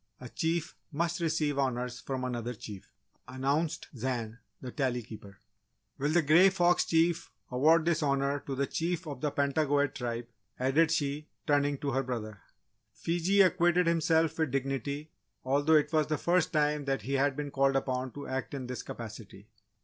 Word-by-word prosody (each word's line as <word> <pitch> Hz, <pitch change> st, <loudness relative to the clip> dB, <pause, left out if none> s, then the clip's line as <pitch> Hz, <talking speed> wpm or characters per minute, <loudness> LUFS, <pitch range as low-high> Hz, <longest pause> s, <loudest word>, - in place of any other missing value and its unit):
"A -, -, -9 dB
Chief 165 Hz, 0 st, -2 dB, 0.2 s
must 170 Hz, +4 st, -1 dB
receive 155 Hz, -4 st, 0 dB
Honours 125 Hz, -2 st, -1 dB
from 130 Hz, -1 st, -4 dB
another 120 Hz, -1 st, -3 dB
Chief," 105 Hz, -2 st, -10 dB, 0.4 s
announced 140 Hz, +5 st, -1 dB
Zan, 120 Hz, -2 st, -3 dB, 0.2 s
the 125 Hz, -, -7 dB
Tally 125 Hz, -3 st, -1 dB
Keeper. 105 Hz, -3 st, -11 dB, 0.6 s
"Will 145 Hz, +2 st, +1 dB
the 165 Hz, +2 st, +3 dB
Grey 170 Hz, +6 st, +6 dB
Fox 175 Hz, -2 st, +3 dB
Chief 165 Hz, +1 st, +1 dB, 0.2 s
award 155 Hz, +6 st, +4 dB
this 165 Hz, -2 st, +1 dB
Honour 140 Hz, 0 st, +1 dB
to 135 Hz, -, -2 dB
the 140 Hz, +1 st, 0 dB
Chief 170 Hz, +4 st, -2 dB
of 140 Hz, -4 st, -7 dB
the 150 Hz, -, +1 dB
Pentagoet 145 Hz, 0 st, +1 dB
Tribe?" 120 Hz, -2 st, -4 dB, 0.3 s
added 140 Hz, +5 st, +3 dB
she, 150 Hz, -1 st, -1 dB, 0.2 s
turning 145 Hz, -1 st, +2 dB
to 140 Hz, 0 st, -2 dB
her 135 Hz, +1 st, +1 dB
brother. 110 Hz, -6 st, -5 dB, 0.5 s
Fiji 175 Hz, -, +1 dB
acquitted 180 Hz, -1 st, +4 dB
himself 165 Hz, -1 st, +2 dB
with 160 Hz, -2 st, +1 dB
dignity, 135 Hz, +3 st, -3 dB, 0.3 s
although 145 Hz, +4 st, +3 dB
it 150 Hz, +1 st, +2 dB
was 155 Hz, -1 st, +3 dB
the 155 Hz, -, 0 dB
first 175 Hz, +1 st, +1 dB
time 150 Hz, -1 st, +1 dB
that 135 Hz, -6 st, -1 dB
he 135 Hz, +5 st, -3 dB
had 135 Hz, 0 st, +2 dB
been 145 Hz, 0 st, -4 dB
called 135 Hz, 0 st, +2 dB
upon 130 Hz, -1 st, -1 dB
to 145 Hz, -, -7 dB
act 130 Hz, +2 st, -4 dB
in 130 Hz, -2 st, -5 dB
this 125 Hz, -1 st, -5 dB
capacity. -, -, -9 dB
145 Hz, 170 wpm, -30 LUFS, 130-160 Hz, 0.6 s, Grey